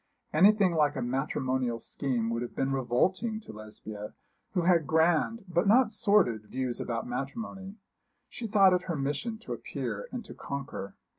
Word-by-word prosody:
Anything 195 Hz, +2 st, +5 dB
like 150 Hz, -2 st, +2 dB
a 130 Hz, -, -2 dB
matrimonial 130 Hz, -2 st, -1 dB
scheme 120 Hz, -3 st, -2 dB
would 115 Hz, 0 st, -1 dB
have 120 Hz, -, -6 dB
been 135 Hz, 0 st, 0 dB
revolting 180 Hz, -, +1 dB
to 160 Hz, -, -11 dB
Lesbia, 105 Hz, 0 st, -9 dB, 0.4 s
who 180 Hz, -, +3 dB
had 170 Hz, -4 st, +3 dB
grand, 170 Hz, +7 st, +2 dB
but 175 Hz, +1 st, +1 dB
not 235 Hz, +2 st, +5 dB
sordid 200 Hz, -, +2 dB
views 130 Hz, -1 st, -3 dB
about 115 Hz, -1 st, -3 dB
matrimony. 190 Hz, -, -5 dB, 0.5 s
She 235 Hz, -, -6 dB
thought 200 Hz, -3 st, +6 dB
it 180 Hz, 0 st, 0 dB
her 170 Hz, -, -2 dB
mission 145 Hz, -, -2 dB
to -, -, -5 dB
appear -, -, -5 dB
and 245 Hz, -, -5 dB
to -, -, -9 dB
conquer. 140 Hz, -8 st, -6 dB
150 Hz, 160 wpm, -29 LUFS, 125-195 Hz, 0.5 s, thought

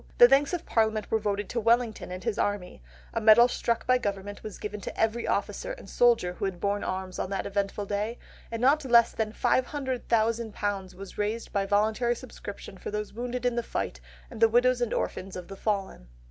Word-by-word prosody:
The 240 Hz, -, +10 dB
thanks 275 Hz, +2 st, +4 dB
of 350 Hz, -2 st, -3 dB
Parliament 220 Hz, -2 st, +1 dB
were 220 Hz, -, +3 dB
voted 205 Hz, -1 st, -1 dB
to 240 Hz, -, -1 dB
Wellington 230 Hz, -3 st, +1 dB
and 185 Hz, 0 st, -6 dB
his 230 Hz, -3 st, -1 dB
army; 205 Hz, -, -2 dB, 0.3 s
a 230 Hz, -, -1 dB
medal 225 Hz, +2 st, +8 dB
struck 235 Hz, -1 st, -1 dB
by 255 Hz, 0 st, +4 dB
government 205 Hz, -2 st, -4 dB
was 215 Hz, -3 st, -7 dB
given 210 Hz, 0 st, -6 dB
to -, -, -7 dB
every 225 Hz, +1 st, +1 dB
officer -, -, -1 dB
and -, -, -11 dB
soldier 235 Hz, -7 st, +3 dB
who 190 Hz, -, -3 dB
had 190 Hz, -3 st, -3 dB
borne 200 Hz, +2 st, 0 dB
arms 185 Hz, 0 st, -4 dB
on -, -, -2 dB
that 195 Hz, -, -2 dB
eventful 200 Hz, +1 st, -2 dB
day; 210 Hz, +4 st, -2 dB, 0.3 s
and 230 Hz, +1 st, -4 dB
not 290 Hz, +4 st, +4 dB
less 235 Hz, -3 st, +5 dB
than 220 Hz, -1 st, -2 dB
£500,000 230 Hz, -7 st, 0 dB
was 195 Hz, +1 st, -10 dB
raised 215 Hz, +3 st, -2 dB
by 195 Hz, -1 st, 0 dB
voluntary 220 Hz, +4 st, +2 dB
subscriptions 205 Hz, -6 st, -9 dB
for -, -, -4 dB
those 210 Hz, 0 st, -4 dB
wounded 245 Hz, +2 st, -4 dB
in 245 Hz, -1 st, +2 dB
the 240 Hz, -, +1 dB
fight, -, -, -4 dB, 0.3 s
and 230 Hz, -2 st, -9 dB
the 225 Hz, -, +7 dB
widows 245 Hz, +2 st, +3 dB
and 240 Hz, -, 0 dB
orphans 190 Hz, 0 st, -3 dB
of 180 Hz, -1 st, -7 dB
the 195 Hz, -, -7 dB
fallen." 195 Hz, -, -2 dB
220 Hz, 200 wpm, -28 LUFS, 200-240 Hz, 0.3 s, The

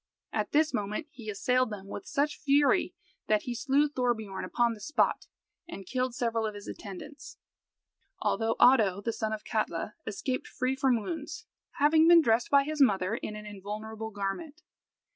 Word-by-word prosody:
At -, -, -1 dB
this 305 Hz, 0 st, +3 dB
moment 210 Hz, +5 st, -2 dB
he 230 Hz, -4 st, -9 dB
assailed 250 Hz, +5 st, +1 dB
them 205 Hz, -3 st, -7 dB
with 375 Hz, -, -8 dB
such 290 Hz, +1 st, 0 dB
fury 285 Hz, 0 st, +3 dB, 0.3 s
that 215 Hz, -1 st, +2 dB
he 245 Hz, -, -3 dB
slew 280 Hz, +4 st, +2 dB
Thorbiorn 235 Hz, -8 st, -2 dB
upon 240 Hz, -1 st, +1 dB
the 220 Hz, -, -11 dB
spot, 305 Hz, +9 st, 0 dB, 0.4 s
and 195 Hz, -, -8 dB
killed 255 Hz, +3 st, -2 dB
several 230 Hz, -2 st, 0 dB
of 210 Hz, -, -6 dB
his 205 Hz, -, -9 dB
attendants, 285 Hz, +9 st, -9 dB, 0.8 s
although 225 Hz, 0 st, 0 dB
Oddo, 210 Hz, -7 st, +5 dB
the 230 Hz, +2 st, -2 dB
son 220 Hz, -1 st, -2 dB
of 215 Hz, -1 st, -4 dB
Katla, 215 Hz, -3 st, -2 dB
escaped 255 Hz, +5 st, -3 dB
free 255 Hz, +1 st, -1 dB
from 265 Hz, -3 st, +2 dB
wounds, 320 Hz, 0 st, -6 dB, 0.3 s
having 315 Hz, +3 st, +4 dB
been 340 Hz, -1 st, +8 dB
dressed 230 Hz, -1 st, +2 dB
by 280 Hz, -1 st, +5 dB
his 305 Hz, +1 st, -2 dB
mother 195 Hz, -6 st, +3 dB
in 215 Hz, -2 st, -4 dB
an 210 Hz, 0 st, -8 dB
invulnerable 215 Hz, +2 st, -6 dB
garment. 205 Hz, -, -5 dB
235 Hz, 165 wpm, -29 LUFS, 210-280 Hz, 0.8 s, been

